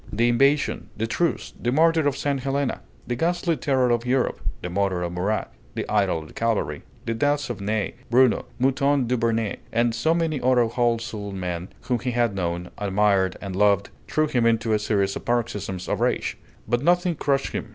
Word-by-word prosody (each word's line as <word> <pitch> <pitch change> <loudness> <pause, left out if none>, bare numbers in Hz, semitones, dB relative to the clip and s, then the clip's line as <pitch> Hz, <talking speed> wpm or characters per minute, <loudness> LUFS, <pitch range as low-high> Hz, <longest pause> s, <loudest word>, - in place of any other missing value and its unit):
The 120 +3 +2
invasion, 140 +5 +2
the 110 - 0
truce, 165 +9 -1
the 120 - 0
martyr 160 +1 +4
of 140 -1 0
St. 140 -1 0
Helena, 140 +1 -1 0.2
the 120 - -2
ghastly 170 +4 +1
terror 130 -4 +1
of 120 -1 +1
Europe, 125 +1 0 0.2
the 90 - -3
murder 95 -1 0
of 85 - -3
Murat, 90 -6 -1 0.2
the - - -3
idol 100 -5 +2
of 80 - -11
the - - -14
cavalry, 100 -11 -1 0.2
the 115 - -1
deaths 145 +3 0
of 110 - -6
Ney, 105 0 -1 0.2
Bruno, 125 +1 +4
Mouton 135 +1 +2
Duvernet, 115 -3 0
and 115 0 +2
so 160 +8 +1
many 160 -4 0
other 125 -1 +4
whole 120 0 +1
souled 105 -4 -6
men 90 -1 -3
whom 125 -1 -1
he 125 +1 -2
had 120 -3 +2
known, 85 -2 -3
admired, 100 -2 +2
and 95 -2 -5
loved, 100 0 +3 0.2
threw 155 - +2
him 120 -6 +1
into 115 -1 +2
a 105 - +3
series 100 -2 0
of - - -6
paroxysms 105 -6 -2
of - - -1
rage; - - 0 0.3
but 120 0 +1
nothing 175 +3 +3
crushed 140 -3 0
him. - - -4
115 Hz, 195 wpm, -24 LUFS, 100-135 Hz, 0.3 s, martyr